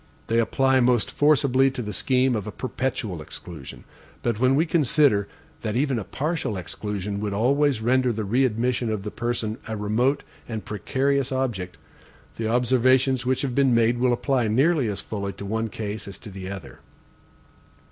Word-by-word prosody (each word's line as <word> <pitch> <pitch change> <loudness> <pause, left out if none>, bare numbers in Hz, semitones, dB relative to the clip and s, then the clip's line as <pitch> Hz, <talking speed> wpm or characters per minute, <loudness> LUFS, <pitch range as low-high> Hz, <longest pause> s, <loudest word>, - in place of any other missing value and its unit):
They 115 +1 +1
apply 130 +3 +3
most 120 -2 +2
forcibly 140 -3 +4
to 130 -2 -5
the 105 -1 -5
scheme 130 +3 +2
of 105 -1 -3
a - - -4
perpetual 120 -9 -3
exclusion; 75 -2 -9 0.4
but 115 -3 0
when 130 +2 +4
we 155 +4 +3
consider 145 - +3 0.3
that 110 -2 -2
even 135 -1 +1
a - - -4
partial 140 - -2
exclusion 100 +2 -4
would 105 -1 -2
always 135 +2 +2
render 125 +2 +2
the 110 -1 -3
readmission 120 +1 +1
of 105 -3 -2
the 105 - -5
person 120 -2 -2
a 110 -1 -3
remote 115 +7 +1 0.3
and 110 -2 -4
precarious 135 +5 0
object, 120 -9 -2 0.6
the 115 - -2
observations 130 +2 +3
which 130 +1 +1
have 135 -3 -1
been 135 -2 +3
made 115 +1 +3
will 125 0 +3
apply 125 -1 +1
nearly 135 +4 +3
as 100 -2 -3
fully 100 -2 -4
to 100 - -8
one 110 +2 -1
case 105 -1 -5
as 100 - -8
to 105 - -11
the 95 -1 -7
other. 100 -2 -8
120 Hz, 170 wpm, -24 LUFS, 105-130 Hz, 0.6 s, forcibly